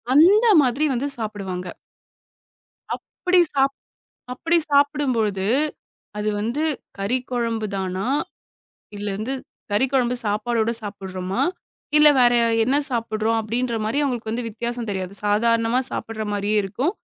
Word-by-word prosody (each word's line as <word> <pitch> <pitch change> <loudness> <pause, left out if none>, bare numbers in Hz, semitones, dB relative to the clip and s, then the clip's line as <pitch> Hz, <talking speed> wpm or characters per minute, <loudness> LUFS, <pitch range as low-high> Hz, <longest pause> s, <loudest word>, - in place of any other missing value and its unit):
அந்த 395 +9 +6 0.2
மாதிரி 265 +4 +1
வந்து 275 +4 -1
சாப்டுவாங்க. 195 -5 -5 1.3
அப்டி 365 0 0
சாப் 275 0 +2 0.6
அப்டி 335 +6 +1
சாப்பிடும்போது 255 -9 +2 0.7
அது 210 0 -1
வந்து 235 +8 -1 0.3
கறி 200 +6 0
குழம்பு 230 -3 -1
தானா? 190 +2 -2 0.9
இல்ல 205 +1 -5
வந்து 250 +5 -2 0.4
கறி 210 +6 +3
குழம்பு 250 -2 +2
சாப்பாடோட 225 +2 0
சாப்டுறோமா? 195 +1 -4 0.5
இல்ல 300 0 +8
வேற 245 0 +5 0.3
என்ன 265 +4 +2
சாப்பிடுறோம் 225 -1 0
அப்டின்ற 235 +2 -2
மாரி 225 +7 -1
அவங்களுக்கு 235 -2 -2
வித்தியாசம் 235 +1 -4
தெரியாது. 190 0 -4
சாதாரணமா 230 +3 +2
சாப்பிடற 220 -1 -4
மாரியே 205 +1 0
இருக்கும். 260 - -2
230 Hz, 110 wpm, -22 LUFS, 210-255 Hz, 1.3 s, இல்ல